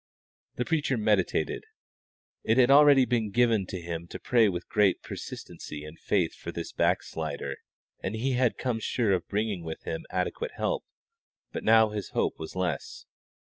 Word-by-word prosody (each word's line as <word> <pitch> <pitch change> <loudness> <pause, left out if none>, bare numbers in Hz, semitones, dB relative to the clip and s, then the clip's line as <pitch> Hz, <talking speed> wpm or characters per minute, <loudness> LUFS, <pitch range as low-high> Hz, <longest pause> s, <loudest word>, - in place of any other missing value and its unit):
The 125 - -1
preacher 150 -6 +1
meditated. 105 -8 +1 0.8
It 115 - +2
had 130 0 +6
already 140 -2 +7
been 115 -4 0
given 115 -3 +2
to 95 - -5
him 85 0 -5
to - - -7
pray 120 -5 +4
with 90 -2 -4
great 105 -3 +2
persistency 75 0 -7
and 75 +2 -11
faith 90 -6 +1
for - - -7
this - - -5
back - - +2
slider, 70 -3 -4 0.4
and 95 - -3
he 125 +5 0
had 125 -2 +2
come 125 -3 -1
sure 110 -1 0
of 90 -3 0
bringing 105 -3 -1
with 80 -1 -6
him 165 0 -5
adequate 475 -1 -2
help; - - -1 0.7
but - - -5
now 110 0 +6
his 105 -2 -5
hope - - -1
was 80 - -7
less. 90 -6 -3
105 Hz, 170 wpm, -28 LUFS, 85-125 Hz, 0.8 s, already